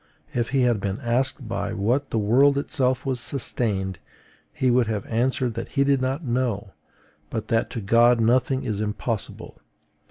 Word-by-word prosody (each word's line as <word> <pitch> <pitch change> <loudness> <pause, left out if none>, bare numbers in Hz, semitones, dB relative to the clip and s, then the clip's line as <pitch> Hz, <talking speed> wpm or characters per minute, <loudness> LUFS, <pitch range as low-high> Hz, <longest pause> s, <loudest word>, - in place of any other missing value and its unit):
If 120 -1 -1
he 135 0 +1
had 120 -3 +2
been 100 +1 -3
asked 125 +1 -1
by 115 0 -3
what 120 +7 0
the - - -1
world 130 +7 +4
itself 130 -3 0
was 130 -2 -1
sustained, 100 - -2 0.5
he 130 -1 +1
would 120 -2 +3
have 105 -3 -2
answered 125 +1 0
that 115 - -6
he 140 - +5
did 140 -1 +2
not 135 +5 -1
know, 120 -5 -1 0.6
but 110 - -4
that 115 -2 +1
to 115 - -5
God 115 +4 +4
nothing 130 +3 +2
is 105 -4 -2
impossible. 110 0 -4
120 Hz, 165 wpm, -24 LUFS, 110-130 Hz, 0.6 s, he